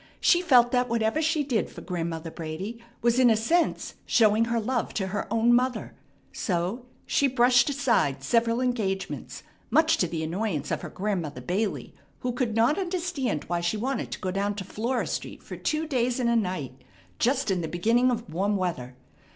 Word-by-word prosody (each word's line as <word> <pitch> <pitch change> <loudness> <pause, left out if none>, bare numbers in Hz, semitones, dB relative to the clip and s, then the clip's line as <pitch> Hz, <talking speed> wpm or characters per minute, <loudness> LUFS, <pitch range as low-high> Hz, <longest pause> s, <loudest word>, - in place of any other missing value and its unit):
She 350 - +4
felt 245 -8 +5
that 250 0 +1
whatever 230 +5 +1
she 320 -1 +1
did 245 -8 -1
for - - -10
Grandmother 165 -2 -4
Brady 185 +9 -6 0.2
was 235 +1 +3
in 250 -2 +6
a 220 - +4
sense 330 +11 0
showing 220 -1 +4
her 235 0 0
love 240 +2 -2
to 190 -2 -1
her 205 +1 -4
own 230 +1 +4
mother; 250 +1 0 0.4
so 190 +7 -2 0.2
she 280 - +2
brushed 245 0 +4
aside 235 - +1
several 230 - +2
engagements, 215 -7 -2 0.3
much 320 0 +4
to 180 - +1
the 160 -1 -3
annoyance 165 -3 -2
of - - -1
her - - -6
Grandmother 180 -10 -3
Bailey, 195 - -2 0.3
who 250 - -1
could 240 -3 -2
not 235 +10 +3
understand 345 - -2
why 175 0 -2
she 170 +5 0
wanted 260 +5 -2
to - - -6
go 185 - -2
down 200 +2 -1
to 200 - -5
Flora 230 +6 -2
Street - - -5
for - - -8
two 310 +1 -1
days 250 -4 0
and 235 -2 +2
a - - +2
night 180 - -2 0.4
just 250 -3 +1
in 185 -2 0
the 160 - -3
beginning 230 +10 +2
of 235 -2 -2
warm 200 +4 +1
weather. 130 -10 -3
230 Hz, 185 wpm, -26 LUFS, 185-250 Hz, 0.4 s, in